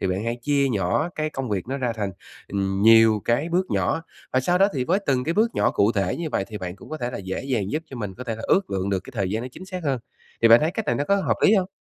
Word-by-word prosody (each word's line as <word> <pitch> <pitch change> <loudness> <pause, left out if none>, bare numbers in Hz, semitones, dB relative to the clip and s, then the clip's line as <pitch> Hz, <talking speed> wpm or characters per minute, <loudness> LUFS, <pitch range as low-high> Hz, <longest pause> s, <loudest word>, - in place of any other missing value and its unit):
thì - - 0
bạn 95 +4 -1
hãy 115 +1 -1
chia 140 -1 +2
nhỏ 105 - 0
cái 155 0 -2
công 135 -4 -4
việc 100 -1 -2
nó 135 - -2
ra 125 -3 -1
thành, 105 -3 -3 0.4
ừm, 95 0 -1
nhiều 115 -1 +6
cái 130 +8 +1
bước 180 +2 +1
nhỏ. 165 - 0 0.3
Và 130 - +3
sau 175 +7 +1
đó 195 +1 +5
thì 130 -2 0
với 185 +7 +2
từng 125 -2 +1
cái 165 - -1
bước 225 +2 +2
nhỏ - - +2
cụ 105 +3 +2
thể 95 -3 0
như 170 -2 -3
vậy 95 - 0
thì 105 -2 -6
bạn 90 0 -6
cũng - - -14
có 155 - -3
thể 120 -4 -3
là - - -5
dễ 95 +3 -4
dàng 115 -8 -1
giúp 155 +2 -2
cho 130 - -7
mình 105 -4 -5
có 125 - -8
thể 115 -3 -3
là 115 - -8
ước 195 - +2
lượng 95 0 -1
được 95 -2 0
cái - - -10
thời 95 -4 -1
gian 110 +3 -2
nó 130 - -5
chính 185 - -10
xác 185 -2 -6
hơn. 135 -4 0 0.4
Thì 115 - +7
bạn 115 +3 +8
thấy 155 +2 +1
cách 210 +3 -4
này - - +1
nó 145 - -1
có 200 +6 +3
hợp 195 - 0
lý 215 - +6
hông? 190 -2 +1
125 Hz, 320 wpm, -24 LUFS, 100-155 Hz, 0.4 s, bạn